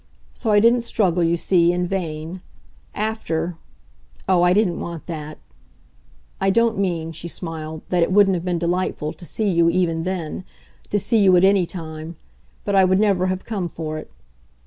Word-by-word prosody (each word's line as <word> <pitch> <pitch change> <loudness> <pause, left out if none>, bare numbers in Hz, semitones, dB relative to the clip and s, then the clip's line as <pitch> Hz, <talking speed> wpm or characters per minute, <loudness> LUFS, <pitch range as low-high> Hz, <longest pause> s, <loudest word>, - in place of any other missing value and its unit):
So - - -4
I 205 -1 +5
didn't 235 +3 +4
struggle, 185 -7 +1
you 170 +1 +2
see, 170 0 +3
in 180 0 -1
vain. 175 -1 -4 0.5
AFTER 190 -6 -2 0.7
oh, 185 -2 +4
I 175 0 +4
didn't 190 -2 +2
want 170 -2 -6
that! 155 -3 -6 1.0
I 195 - +2
don't 230 +1 +2
mean," 170 -4 -1
she 165 +1 -7
smiled, 160 -2 -6
"that 180 -1 +1
it 170 - +2
wouldn't 200 0 +5
have 170 -2 -2
been 180 -1 -1
delightful 170 -2 -1
to 175 - -11
see 210 +3 -1
you 170 -1 +4
even 170 -2 +1
then 180 -1 -4 0.5
to 205 - +1
see 225 +3 +2
you 190 -3 +6
at 175 - +3
any 195 -2 +4
time; 160 -1 -7 0.5
but 200 - -1
I 190 - +6
would 185 0 +3
never 195 -3 +2
have 185 0 -3
come 195 -6 -3
for 155 -1 -5
it. - - -11
180 Hz, 180 wpm, -21 LUFS, 165-195 Hz, 1.0 s, you